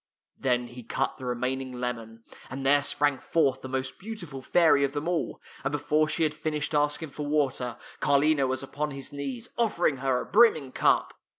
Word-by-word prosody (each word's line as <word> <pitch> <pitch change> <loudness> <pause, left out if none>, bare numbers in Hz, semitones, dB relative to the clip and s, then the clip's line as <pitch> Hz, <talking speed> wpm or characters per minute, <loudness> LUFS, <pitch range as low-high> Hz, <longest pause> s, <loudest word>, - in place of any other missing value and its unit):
" - - -67
Then 125 -2 0
he 120 +1 -10
cut 115 - -2
the 130 - -7
remaining 125 +1 -2
lemon, 115 -2 -5 0.3
and 135 +1 -5
there 145 +1 +5
sprang 145 -1 +1
forth 135 -5 +1
the 130 - -7
most 130 0 -3
beautiful 180 -10 -7
fairy 145 -1 +4
of 140 0 0
them 145 +2 -3
all, 175 -2 -1 0.2
and 135 - -1
before 150 +1 +1
she 165 - 0
had 155 -1 +1
finished 155 0 -3
asking 150 +1 +1
for 145 +1 -5
water, 135 -5 0 0.2
Carlino 145 0 +3
was 130 +1 -2
upon 150 +2 -3
his 135 -1 -8
knees, 135 -5 -5
offering 175 - +2
her 130 -1 +1
a - - -5
brimming 180 - +4
cup. - - +2
140 Hz, 190 wpm, -27 LUFS, 130-150 Hz, 0.3 s, there